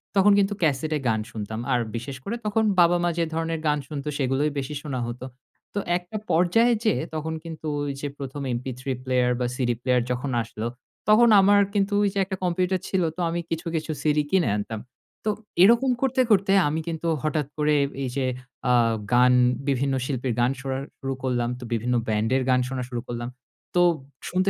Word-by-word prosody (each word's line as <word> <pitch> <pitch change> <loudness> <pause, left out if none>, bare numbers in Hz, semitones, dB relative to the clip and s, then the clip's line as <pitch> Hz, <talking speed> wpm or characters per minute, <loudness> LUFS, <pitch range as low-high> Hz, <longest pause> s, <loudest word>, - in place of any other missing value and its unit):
তখন 200 +1 +6
কিন্তু 200 +1 +2
ক্যাসেটে 155 +1 +1
গান 110 -1 +2
শুনতাম। 110 +1 -5
আর 125 - +3 0.2
বিশেষ 130 +4 -5
করে 230 - -3
তখন 220 +1 +1 0.2
বাবা-মা 175 0 +4
যে 170 - +2
ধরনের 165 0 -1
গান 150 0 +2
শুনত 145 -2 -6
সেগুলোই 135 +2 +1
বেশি 135 +2 -4
শোনা 135 -4 -4
হতো। 120 +2 -6 0.5
তো 205 - -1 0.2
একটা 180 +4 -7
পর্যায়ে 180 +9 +4
যেয়ে 220 - +2
তখন 160 +1 -3
কিন্তু 160 -2 -7 0.2
ওই 145 - -2
যে 145 - -2
১ম 140 0 -6
এমপি 125 +2 -3
থ্রি 135 +1 -3
প্লেয়ার 125 -1 +2
বা 125 - 0
সিডি 120 -2 0
প্লেয়ার 125 -1 +2
যখন 125 +2 -2
আসলো। 115 0 -5 0.4
তখন 235 +2 +7
আমার 205 +1 +5
কিন্তু 200 0 +1
ওই 200 - +3
যে - - -5
একটা 190 0 -4
কম্পিউটার 180 +1 +1
ছিল 190 -2 +1
তো 180 - -4
আমি 170 +1 -2
কিছু, 165 +2 -3
কিছু 160 0 -2
সিডি 150 -1 +2
কিনে 180 - +3
আনতাম। 105 +1 -4 0.5
তো - - +2 0.3
এরকম 235 +5 +5
করতে, 260 -1 +2
করতে 195 -1 +4 0.2
আমি 155 +2 -1
কিন্তু 165 0 -3 0.2
হঠাৎ 155 -2 0
করে 150 0 +2 0.3
এই 130 - -2
যে 135 - +1 0.5
আ - - +5 0.4
গান 125 +1 +6 0.3
বিভিন্ন 135 0 +1
শিল্পীর 130 -3 -2
গান 120 +2 +3
শোনা 135 0 -3 0.2
শুরু 135 -1 -3
করলাম। 120 -2 0
তো - - -9
বিভিন্ন 120 +2 0
ব্যান্ডের 110 +5 +1
গান 125 0 +4
শোনা 130 -1 -3
শুরু 120 -2 -3
করলাম। 120 0 -4 0.5
তো 175 - +5 0.5
শুনতে, 185 +2 +1
150 Hz, 190 wpm, -25 LUFS, 125-180 Hz, 0.5 s, তখন